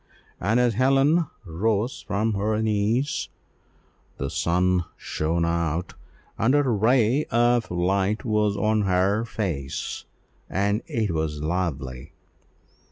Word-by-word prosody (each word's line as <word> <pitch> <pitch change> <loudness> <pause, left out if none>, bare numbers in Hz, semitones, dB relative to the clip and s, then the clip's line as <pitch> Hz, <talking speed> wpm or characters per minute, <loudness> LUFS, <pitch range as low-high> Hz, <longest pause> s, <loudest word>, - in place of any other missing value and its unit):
And 110 +6 +1
as 120 -2 +3
Helen 135 - +3 0.2
rose 105 +7 -1
from 110 +2 0
her 105 +2 0
knees, 110 +6 0 0.9
the 70 0 -3
sun 90 +1 +1
shone 85 +2 -1
out, 85 +1 -1 0.5
and 125 +6 +3
a 145 - +4
ray 120 +3 +2
of 120 0 +2
light 95 +5 0
was 105 -2 +1
on 110 0 +2
her 95 +3 +2
face, 85 -12 -4 0.4
and 100 +2 0
it 110 -5 -1
was 80 -2 -2
lovely. 75 -6 -3
100 Hz, 110 wpm, -25 LUFS, 85-115 Hz, 0.9 s, a